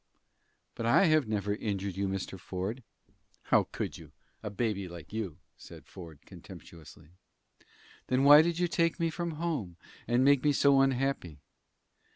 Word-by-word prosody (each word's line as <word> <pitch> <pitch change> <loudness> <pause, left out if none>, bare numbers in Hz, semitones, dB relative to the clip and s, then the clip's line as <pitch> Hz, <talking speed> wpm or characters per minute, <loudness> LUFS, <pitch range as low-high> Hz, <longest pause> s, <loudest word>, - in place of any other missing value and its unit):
"But 115 - -4
I 120 +11 +5
have 155 -6 +3
never 105 -1 -1
injured 100 -3 -4
you, 100 0 -1
Mr. 95 0 -5
Ford." 95 +7 -5 0.6
"How - - +3
could - - -5
you - - -14 0.3
a 105 - -5
baby 105 -2 -2
like 85 +1 -11
you?" 100 -8 -4 0.2
said - - -13
Ford, 80 -5 -12
contemptuously. 80 -2 -14 1.0
"Then 130 +1 +1
why 145 +2 +9
did 170 +1 -1
you 175 0 +1
take 165 0 0
me 165 -1 0
from 170 0 -4
home, 150 - -4 0.3
and 120 +2 +2
make 140 -2 +4
me 150 -1 +3
so 140 0 +4
unhappy?" 135 - -1
115 Hz, 155 wpm, -30 LUFS, 95-145 Hz, 1.0 s, why